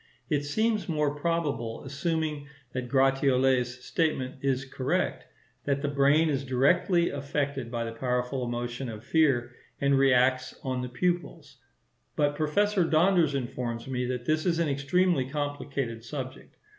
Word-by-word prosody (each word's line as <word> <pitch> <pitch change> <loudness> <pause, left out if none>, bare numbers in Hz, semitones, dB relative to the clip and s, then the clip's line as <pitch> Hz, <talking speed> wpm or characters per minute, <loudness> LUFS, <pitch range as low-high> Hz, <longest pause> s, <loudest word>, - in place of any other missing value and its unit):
It 145 -1 +2
seems 220 +7 0
more 150 -3 +1
probable, 145 -8 -2
assuming 150 +1 -2 0.3
that 125 -1 -4
Gratiolet's 130 -2 +2
statement 145 -6 -1
is 135 -1 0
correct, 130 -1 -1 0.4
that 140 0 0
the - - +1
brain 145 +3 +4
is 140 -3 0
directly 140 +7 +2
affected 140 -2 -2
by 120 -1 -2
the 115 - -4
powerful 125 +2 -1
emotion 120 +1 -3
of 110 0 -8
fear 130 -4 +2 0.3
and 140 0 +3
reacts 130 -1 +3
on 130 -1 -2
the 125 - -4
pupils; 155 -1 -2 0.6
but 145 -1 +1
Professor 185 +6 +2
Donders 165 -2 +3
informs 120 -2 -4
me 125 -1 -2
that 125 -1 -3
this 155 +4 +1
is 170 -2 +2
an 165 -1 +1
extremely 140 +1 +1
complicated 140 -5 -3
subject. 130 +1 -7
140 Hz, 140 wpm, -28 LUFS, 125-155 Hz, 0.6 s, brain